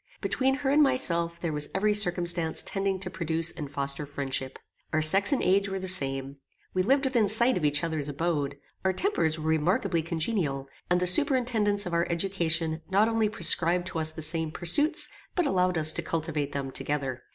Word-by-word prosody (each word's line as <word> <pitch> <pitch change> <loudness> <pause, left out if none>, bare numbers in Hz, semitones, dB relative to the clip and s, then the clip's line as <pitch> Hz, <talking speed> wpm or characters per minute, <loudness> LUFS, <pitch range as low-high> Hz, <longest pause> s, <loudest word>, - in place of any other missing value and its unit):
Between 265 0 0
her 270 -1 -1
and 295 +2 +4
myself 170 - +2
there 165 -3 -3
was 150 0 -1
every 210 +2 +2
circumstance 175 -4 +2
tending 195 -1 -1
to 185 - -3
produce 165 -1 +1
and 150 -4 -7
foster 140 +1 -3
friendship. 135 -2 -4 0.3
Our 155 - +1
sex 195 +6 +4
and 280 - +1
age 195 +2 +2
were 195 - -3
the 190 0 -5
same. 135 -6 0 0.4
We 185 - +1
lived 270 +8 +2
within 240 -5 +2
sight 235 +4 +3
of 175 - -3
each 145 +1 +2
other's 155 -3 -2
abode. 145 -2 -2 0.3
Our 190 0 +1
tempers 185 - 0
were 155 - -7
remarkably 165 +2 +1
congenial, 160 -4 -2 0.2
and 180 0 +2
the 180 - 0
superintendants 220 - +2
of 180 - -5
our 170 0 +1
education 165 -3 0
not 205 +4 +3
only 225 -2 +1
prescribed 175 -4 +1
to 165 - -4
us 155 0 -1
the 160 0 -4
same 160 0 0
pursuits, 290 - 0 0.3
but 355 - +1
allowed 180 - +1
us 155 0 +3
to - - -2
cultivate 155 -3 -3
them 135 -1 -4
together. 135 -3 -3
170 Hz, 190 wpm, -27 LUFS, 155-205 Hz, 0.4 s, and